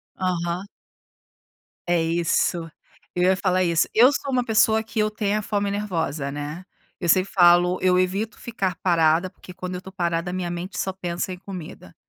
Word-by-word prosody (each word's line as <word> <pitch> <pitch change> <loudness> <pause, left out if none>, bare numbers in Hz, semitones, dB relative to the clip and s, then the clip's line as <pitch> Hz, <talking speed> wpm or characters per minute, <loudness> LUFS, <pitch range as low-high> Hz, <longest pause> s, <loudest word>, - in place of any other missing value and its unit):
Aham. 180 0 -2 1.2
É 175 -1 +3
isso, 170 0 0 0.5
eu 180 - +1
ia 185 +1 +4
falar 185 -1 +1
isso. 170 -2 +2
Eu 250 +5 +7
sou 280 - -3
uma 255 -2 +1
pessoa 220 -1 +3
que 225 0 -5
eu 215 0 +2
tenho 210 0 -1
a - - -3
fome 205 -1 -1
nervosa, 165 -8 -2
né. 150 +5 -6 0.3
Eu 175 - -3
sempre 185 +3 +3
falo: 175 0 +5
eu 185 -1 +3
evito 195 +5 -1
ficar 195 -6 -3
parada, 165 0 +3
porque 180 - -14
quando 185 0 -6
eu - - -3
estou 190 +1 -11
parada, 170 0 -1
a - - -6
minha 180 -2 -2
mente 175 +3 -5
só 190 - -1
pensa 180 -1 -4
em 180 - -6
comida. 175 - -9
185 Hz, 185 wpm, -23 LUFS, 170-200 Hz, 1.2 s, Eu